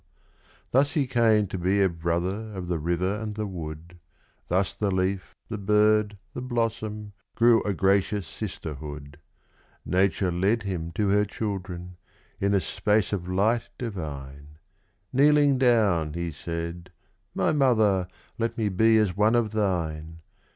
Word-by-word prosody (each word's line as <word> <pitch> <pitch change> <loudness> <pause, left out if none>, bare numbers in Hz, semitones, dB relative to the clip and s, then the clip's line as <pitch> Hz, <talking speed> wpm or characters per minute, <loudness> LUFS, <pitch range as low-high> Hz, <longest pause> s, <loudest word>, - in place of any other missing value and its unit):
Thus 140 +3 +3
he 150 -4 +1
came 115 -4 +3
to 95 -1 -5
be 95 +3 +1
a 100 - +5
brother 90 +5 -2
of 90 -2 -5
the 85 -2 -1
river 90 +5 -1
and 105 -1 -4
the 110 0 -2
wood 85 -2 -8 0.5
Thus 95 +2 +1
the 105 - -1
leaf, 95 0 -1
the 110 -2 -5
bird, 105 +1 +3 0.2
the - - -5
blossom, 115 -4 -3 0.2
grew 115 -1 +5
a 100 -2 -2
gracious 100 +1 +1
sisterhood; 75 -7 -7 0.7
Nature 95 0 +1
led 100 +6 +1
him 85 -4 -4
to 105 -3 0
her 105 +1 +4
children, 95 -4 -5 0.4
in 100 +1 +2
a - - +4
space 105 +5 0
of 90 -3 -3
light 105 +6 +1
divine: 75 - -7 0.6
Kneeling 145 0 +4
down, 105 - +3
he 85 0 -3
said 85 +3 -6 0.4
"My - - +2
mother, 110 -10 +3 0.3
let 115 0 -1
me 110 -3 +1
be 110 +4 +4
as 105 -5 +2
one 105 +3 +3
of 115 -3 +1
thine!" 80 -6 -2
100 Hz, 145 wpm, -26 LUFS, 85-110 Hz, 0.7 s, a